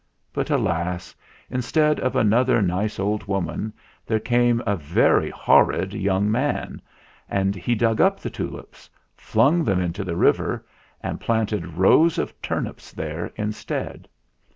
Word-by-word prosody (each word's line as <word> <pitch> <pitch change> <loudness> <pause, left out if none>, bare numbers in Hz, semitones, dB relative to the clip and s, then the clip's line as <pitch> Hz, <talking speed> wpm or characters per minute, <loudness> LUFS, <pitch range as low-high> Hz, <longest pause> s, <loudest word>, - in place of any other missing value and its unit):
But, - - -2
alas! 85 +2 -1 0.4
instead 150 +5 +1
of 130 +1 -1
another 120 +1 +3
nice 100 +2 -1
old 105 +2 -1
woman, 95 +1 -2 0.3
there 110 -1 0
came 120 +1 +2
a 100 -2 +1
very 80 -2 +2
horrid 95 +1 +3
young 100 0 +1
man, 135 +6 -1 0.5
and 95 0 +1
he 110 +6 -1
dug 115 0 +2
up - - +3
the - - -5
tulips, - - -8 0.3
flung 165 +5 +2
them 95 -5 +1
into 90 +2 -2
the 85 -3 -3
river, - - +1 0.4
and - - -4
planted 110 -7 -1
rows 155 - +5
of - - -2
turnips - - -4
there 80 +2 -5
instead. 105 0 -4
105 Hz, 135 wpm, -23 LUFS, 95-120 Hz, 0.5 s, rows